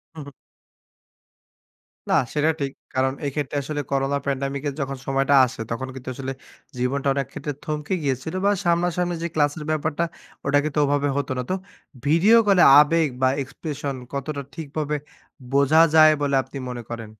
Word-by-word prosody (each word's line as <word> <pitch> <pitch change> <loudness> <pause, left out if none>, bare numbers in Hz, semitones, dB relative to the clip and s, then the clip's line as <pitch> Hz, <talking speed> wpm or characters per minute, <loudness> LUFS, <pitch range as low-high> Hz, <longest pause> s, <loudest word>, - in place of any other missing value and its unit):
হু, 155 - -7
হু। 140 - -10 1.8
না, - - +3 0.2
সেটা 150 +1 +2
ঠিক। 135 -1 -1 0.2
কারণ 130 0 +1
এক্ষেত্রে 145 0 -3
আসলে 145 +1 -3
করোনা 135 +1 +1
প্যান্ডেমিকের 140 +1 -2
যখন 135 0 -3
সময়টা 135 +1 +2
আসে, 125 -2 -7
তখন 130 +3 -3
কিন্তু 130 0 -7
আসলে, 135 0 -4 0.5
জীবনটা 135 +3 -1
অনেক 135 -2 -2
ক্ষেত্রে 145 - -5
থমকে 150 +3 -3
গিয়েছিল, 135 +4 -2
বা 205 - +5
সামনাসামনি 175 +1 +1
যে - - 0
ক্লাসের 150 0 0
ব্যাপারটা, 155 +1 -1 0.4
ওটা 140 +1 +3
কিন্তু 150 0 -1
ওভাবে 145 0 +1
হতো 140 -1 -2
না। - - 0
তো, 185 - +1 0.5
ভিডিও 175 +10 +5
কলে 190 -3 +6 0.2
আবেগ 160 +1 +4
বা 130 - +4
এক্সপ্রেশন, 140 0 -5 0.2
কতটা 140 +1 -3
ঠিকভাবে 150 -1 -3 0.6
বোঝা 140 +3 +5
যায় 155 0 +8
বলে 140 -1 +1
আপনি 135 +1 -10
মনে 120 -1 -6
করেন? 115 -2 -6
145 Hz, 155 wpm, -23 LUFS, 135-155 Hz, 1.8 s, যায়